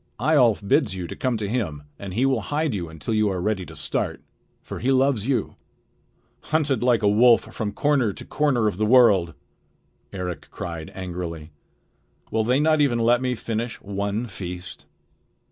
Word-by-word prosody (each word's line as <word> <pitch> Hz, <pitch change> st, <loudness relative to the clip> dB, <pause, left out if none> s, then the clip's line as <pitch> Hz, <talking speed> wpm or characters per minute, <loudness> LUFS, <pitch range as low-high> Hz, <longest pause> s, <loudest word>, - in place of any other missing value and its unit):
Eyjolf 120 Hz, -7 st, +3 dB
bids 100 Hz, -1 st, +2 dB
you 90 Hz, -2 st, -5 dB
come 125 Hz, +4 st, -2 dB
to 105 Hz, -2 st, -3 dB
him, 95 Hz, -11 st, -2 dB, 0.2 s
and 95 Hz, -2 st, -7 dB
he 125 Hz, -, +2 dB
will 130 Hz, -4 st, +1 dB
hide 150 Hz, +4 st, -1 dB
you 85 Hz, -5 st, -4 dB
until 80 Hz, +6 st, -5 dB
you 110 Hz, -1 st, +2 dB
are 95 Hz, -2 st, -2 dB
ready 95 Hz, -1 st, -1 dB
to -, -, -11 dB
start; -, -, -2 dB, 0.4 s
for -, -, -7 dB
he 130 Hz, +4 st, +1 dB
loves 130 Hz, -4 st, +2 dB
you." 125 Hz, -7 st, -1 dB, 0.9 s
"Hunted 150 Hz, -6 st, 0 dB
like 120 Hz, -3 st, +2 dB
a -, -, +4 dB
wolf 115 Hz, +3 st, +4 dB
from 105 Hz, -2 st, -3 dB
corner 135 Hz, -1 st, +1 dB
to -, -, -10 dB
corner 130 Hz, -7 st, +1 dB
of 100 Hz, -, -2 dB
the 110 Hz, -, +1 dB
world!" 105 Hz, -, +5 dB, 0.8 s
Eric 90 Hz, -3 st, -5 dB
cried 85 Hz, -2 st, -6 dB
angrily. 85 Hz, -4 st, -6 dB, 0.8 s
"Will 110 Hz, 0 st, +1 dB
they 125 Hz, +4 st, +2 dB
not 155 Hz, 0 st, +3 dB
even 135 Hz, -5 st, +3 dB
let 120 Hz, +2 st, +3 dB
me 125 Hz, -1 st, 0 dB
finish 115 Hz, +1 st, -4 dB
one 100 Hz, +3 st, -3 dB
feast?" 90 Hz, -3 st, -7 dB
110 Hz, 170 wpm, -24 LUFS, 95-125 Hz, 0.9 s, world